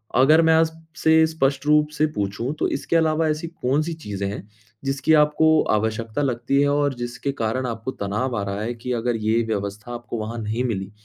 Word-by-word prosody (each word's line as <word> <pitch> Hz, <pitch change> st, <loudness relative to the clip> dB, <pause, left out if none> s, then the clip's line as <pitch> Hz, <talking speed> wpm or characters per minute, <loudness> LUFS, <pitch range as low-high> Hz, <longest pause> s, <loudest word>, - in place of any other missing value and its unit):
अगर 145 Hz, +6 st, +6 dB
मैं 160 Hz, 0 st, +4 dB
आपसे 160 Hz, 0 st, +2 dB
स्पष्ट 140 Hz, -3 st, 0 dB
रूप 150 Hz, 0 st, +4 dB
से 155 Hz, -, +3 dB
पूछूँ, 105 Hz, +7 st, -2 dB
तो -, -, +2 dB
इसके 140 Hz, -, -2 dB
अलावा 160 Hz, 0 st, +2 dB
ऐसी 155 Hz, +2 st, -2 dB
कौन-सी 155 Hz, +1 st, -1 dB
चीजें 100 Hz, -11 st, -5 dB
हैं, 100 Hz, -, -8 dB, 0.4 s
जिसकी 135 Hz, +3 st, +1 dB
आपको 155 Hz, +1 st, +4 dB
आवश्यकता 110 Hz, +3 st, -1 dB
लगती 130 Hz, +1 st, +1 dB
है? 145 Hz, -, +3 dB
और 145 Hz, -1 st, +1 dB
जिसके 120 Hz, +3 st, -4 dB
कारण 125 Hz, 0 st, -2 dB
आपको 115 Hz, +2 st, -4 dB
तनाव 105 Hz, +4 st, -2 dB
आ 100 Hz, -, -2 dB
रहा 100 Hz, +1 st, -3 dB
है 115 Hz, +3 st, -2 dB
कि 120 Hz, +1 st, -6 dB
अगर 120 Hz, 0 st, -1 dB
ये 110 Hz, +1 st, +1 dB
व्यवस्था 105 Hz, +2 st, -4 dB
आपको 120 Hz, 0 st, -6 dB
वहाँ 110 Hz, +2 st, -5 dB
नहीं 110 Hz, +3 st, -2 dB
मिली, 100 Hz, -6 st, -3 dB
130 Hz, 190 wpm, -23 LUFS, 110-150 Hz, 0.4 s, अगर